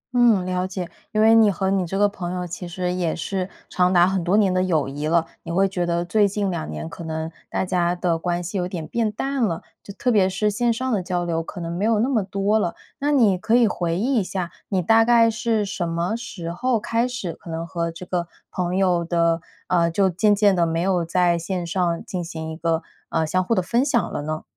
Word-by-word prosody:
嗯， 225 -7 +4
了 185 0 -1
解， 180 -2 -5 0.2
因 215 - +1
为 225 - +7
你 225 -2 +6
和 190 0 0
你 190 -3 +1
这 190 - -3
个 205 +1 +5
朋 180 -3 -5
友 180 -1 -3
其 175 +1 -6
实 180 +1 -2
也 175 -3 -1
是 185 +2 -3 0.2
长 180 0 +2
达 175 -1 +5
很 190 -2 0
多 185 +4 +2
年 195 -3 +3
的 185 - +2
友 165 -7 +1
谊 145 +2 -4
了， 165 +1 +2 0.2
你 - - -7
会 195 +3 +3
觉 180 -2 -2
得 170 0 0
最 205 +3 +3
近 200 -1 -1
2 75 - -4
年 75 0 -5
可 170 - -8
能 160 0 -4 0.2
大 - - -1
家 175 -1 +1
的 175 -2 0
关 175 +1 -1
系 185 +3 -3
有 180 - -1
点 175 -4 -5
变 230 -2 0
淡 270 +5 -2
了， 170 -7 -1 0.2
就 - - -10
特 250 - 0
别 195 -4 +4
是 210 +3 0
线 240 +3 +1
上 255 +3 -2
的 205 -5 +1
交 180 -1 -2
流， 165 -1 -1
可 165 - -8
能 170 0 -4
没 185 - -2
有 225 0 +3
那 235 +6 +1
么 235 -5 +2
多 200 +3 +1
了。 175 - -1 0.2
那 290 +1 +1
你 220 -10 +4
可 220 +4 +2
以 240 -2 +5
回 170 -3 -1
忆 250 +6 +1
一 200 - 0
下， 180 -2 -4 0.2
你 190 -3 0
大 225 +5 +5
概 230 -1 +5
是 220 -1 0
什 180 -3 -3
么 170 +6 -1
时 195 -8 -6
候 240 +6 0
开 230 +3 0
始 245 -9 -4
可 170 - -13
能 165 +1 -3
和 170 0 -2
这 165 +2 -9
个 175 -1 -2 0.2
朋 180 0 -2
友 180 -3 +2
的 170 -1 +1 0.3
呃， 170 -2 +3
就 190 +3 +2
渐 205 +4 +3
渐 200 -1 +4
地 170 -2 +2
没 165 0 -1
有 180 0 +1
在 175 0 +2
线 175 +1 -3
上 170 -1 -1
进 180 -2 -4
行 160 -2 -6
一 - - -6
个， 165 0 -1 0.3
呃， 160 -1 +1
相 185 +4 +1
互 230 +5 +1
的 185 - +1
分 235 +7 +1
享 255 -6 0
了 - - -2
呢？ 155 +1 -4
185 Hz, 265 characters per minute, -23 LUFS, 170-210 Hz, 0.3 s, 为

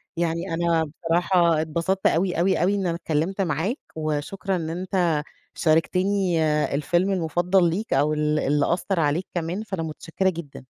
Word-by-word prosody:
يعني 170 -1 -2
أنا 165 -1 +2 0.2
بصراحة 170 -1 +3
اتبسطت 170 +5 0
أوي، 175 0 +1
أوي، 185 -1 +2
أوي، 195 +3 +2
إن 195 -2 -1
أنا 170 - -1
اتكلمت 170 +4 -1
معاك، 175 - -1 0.2
وشكرًا 155 +6 -2
إن 160 -2 -3
أنت 175 -3 0 0.3
شاركتيني 180 +2 +1 0.3
الفيلم 175 +6 +1
المفضل 175 +1 +2
ليك 205 +7 -2
أو 145 +3 +2
ال 150 0 +1
اللي 145 +3 +1
أثّر 185 0 -1
عليك 155 +4 0
كمان، 175 +5 -2
فأنا 190 -6 -4
متشكرة 165 +4 -2
جدًا. 160 -7 -8
170 Hz, 150 wpm, -24 LUFS, 160-185 Hz, 0.3 s, بصراحة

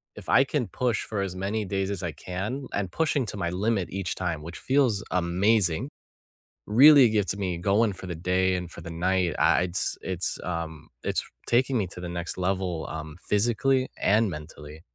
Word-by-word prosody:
if - - -10
I 135 - +6
can 135 -4 -1
push 120 +5 -1
for 105 -3 -3
as 95 -2 -3
many 100 +3 -2
days 95 0 -2
as 100 - -4
I 85 - -2
can, 105 - -5
and 95 -3 -2
pushing 150 - +1
to 105 - -4
my 85 -3 -1
limit 100 +1 0
each 95 -2 -3
time, 85 -4 -2
which 85 +2 -8
feels 130 -7 +2
amazing, 90 - +2 0.8
really 135 +4 +8
gets 100 -3 +1
me 95 -4 -2
going 100 +4 +2
for 95 0 -9
the 90 - -4
day 90 +2 +1
and 90 -1 -5
for 85 - -10
the 85 - -8
night, 90 0 0
I - - +4
it's 90 +1 -1
it's, 95 -1 -2
um, 80 -3 -5 0.2
it's - - 0 0.2
taking 130 +2 +2
me 100 - 0
to 90 - -10
the 90 - -5
next 85 0 -4
level, 90 -3 -1
um, 80 -1 -6
physically 120 +5 +2
and 105 +1 +3
mentally. 75 -1 -9
95 Hz, 190 wpm, -26 LUFS, 85-110 Hz, 0.8 s, really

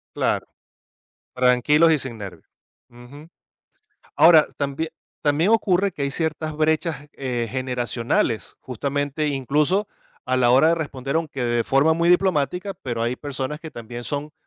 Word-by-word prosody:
Claro, - - 0 0.9
tranquilos 130 +6 +4
y 155 - +3
sin 130 -3 -6
nervios. 95 -5 -9 0.4
Ujú. 125 +6 -14 0.9
Ahora, 160 -2 +7
también 145 +3 -3 0.3
también 150 +5 +2
ocurre 200 -3 +2
que 150 - -6
hay 140 - 0
ciertas 155 0 -2
brechas, 155 -1 0
eh, 120 -4 -3
generacionales, 120 -3 -1
justamente 145 +4 -2
incluso 150 - 0 0.4
a 130 - +1
la 125 -1 +3
hora 135 +6 +5
de 170 - +4
responder 140 -3 -3
aunque 150 -5 -3
de 120 -1 +1
forma 145 +4 +3
muy 170 +1 +2
diplomática, 180 +1 +1
pero 120 -3 -3
hay 120 +2 -1
personas 140 +1 -5
que 160 -1 -9
también 120 -1 -8
son 150 +1 -4
145 Hz, 140 wpm, -22 LUFS, 125-160 Hz, 0.9 s, Ahora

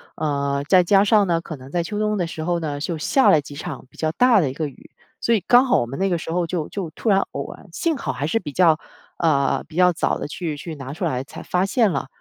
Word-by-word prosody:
呃， 140 -2 -1
再 185 -2 +6
加 195 +3 +4
上 210 0 +4
呢， 170 -2 0
可 165 - -7
能 130 0 -13
在 175 - 0
秋 190 +5 -4
冬 210 0 0
的 175 -3 -1
时 160 -1 -6
候 175 +1 0
呢， 150 -3 -4
就 160 +1 -3
下 265 - +4
了 155 - +4
几 145 0 -11
场 145 -3 -7
比 - - -22
较 155 -1 0
大 240 +5 +4
的 160 - +1
一 - - -8
个 155 +2 -3
雨， 135 - -15 0.3
所 235 - +1
以 225 - +3
刚 245 +2 +6
好 255 - +3
我 120 - -2
们 135 - -6
那 195 - +1
个 175 -3 0
时 165 - -6
候 175 +1 0
就 165 -2 -3
就 185 -6 -5
突 220 - -3
然 195 -1 +4
偶 - - -5
然 - - -17
幸 330 -4 0
好 130 - -3
还 135 +4 -3
是， 175 - +1
呃， - - -4
比 150 - -5
较， 165 0 +4 0.4
呃， 150 -5 +1 0.3
早 - - 0
地 - - -4
去 160 0 -4
去 160 +2 -7
拿 135 -1 -7
出 180 +5 -6
来 130 -7 -1
才 - - -10
发 180 +1 0
现 215 +1 +2
了。 140 -4 -2
165 Hz, 300 characters per minute, -22 LUFS, 145-195 Hz, 0.4 s, 再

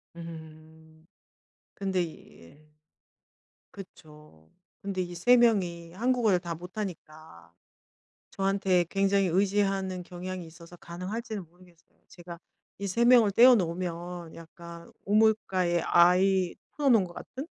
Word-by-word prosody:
음 160 -1 -13 0.7
근데 190 -2 -1
이 165 -2 -10
예. 150 - -19 1.1
그쵸. 150 - -15 0.3
근데 195 -2 -3
이 175 -1 -5
3 245 +9 +4
명이 180 -8 +1
한국어를 225 -2 +1
다 170 -1 -5
못 180 +4 -12
하니까 155 - -8 0.8
저한테 195 -2 +1
굉장히 195 0 +2
의지하는 195 0 0
경향이 180 0 -7
있어서 170 +1 -14
가능할지는 195 +5 -6
모르겠어요. 175 0 -24
제가 175 -1 -11 0.4
이 200 - -4
3 215 +5 0
명을 240 -4 +6
떼어 245 +5 +7
놓으면 175 -2 -4
약간 170 0 -12
우물가에 200 -5 +2
아이 180 +2 +3 0.2
풀어 290 -2 0
놓은 225 -7 +5
것 175 - -10
같은? 270 - -8
180 Hz, 245 characters per minute, -28 LUFS, 170-195 Hz, 1.1 s, 떼어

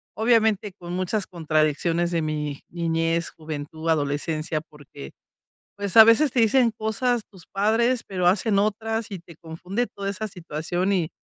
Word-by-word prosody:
obviamente 220 -3 +2
con 175 0 -7
muchas 185 +3 -1
contradicciones 165 +1 0
de 170 -2 0
mi 150 -2 -3
niñez, 165 0 -1
juventud, 155 +1 -6
adolescencia, 155 +1 -1
porque, 145 - -13 0.7
pues, 200 +1 -1
a 220 - +12
veces 235 +5 +5
te 250 - 0
dicen 230 +1 +4
cosas 220 +2 -1
tus 185 -4 -16
padres, 225 +5 +1
pero 180 -2 0
hacen 200 +2 +3
otras 220 +2 -1
y 195 - -5
te 170 -1 -15
confunde 180 +9 -4
toda 200 0 -5
esa 215 +2 -4
situación. 175 +3 -2
Y 170 -4 0
180 Hz, 150 wpm, -24 LUFS, 160-220 Hz, 0.7 s, a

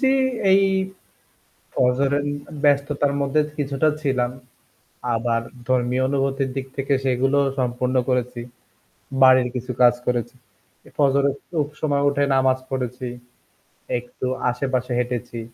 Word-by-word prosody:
জ্বি, 265 -1 +4 0.4
এই 195 +1 +6 1.1
ফজরের 135 +3 +2 0.4
ব্যস্ততার 145 0 +2
মধ্যে 140 +2 +2 0.2
কিছুটা 145 +1 +1
ছিলাম। 130 -4 0 0.8
আবার 115 0 0 0.3
ধর্মীয় 125 0 +1
অনুভূতির 135 -1 0
দিক 135 -1 -3
থেকে 140 0 0
সেগুলোও 135 +2 +2
সম্পূর্ণ 125 +1 -1
করেছি। 125 -1 -1 0.8
বাড়ির 130 -1 +7
কিছু 125 +1 -3
কাজ 120 -1 +7
করেছি। 120 0 -1 0.5
এ - - -14
ফজরে 140 -1 +3 0.2
খুব 155 -4 0
সময় 145 -2 +1
উঠে 140 0 0
নামাজ 130 0 +3
পড়েছি। 125 -1 -3 0.9
একটু 125 +1 -8 0.2
আশেপাশে 125 0 -2
হেঁটেছি। 120 -1 -3
130 Hz, 110 wpm, -22 LUFS, 125-140 Hz, 1.1 s, বাড়ির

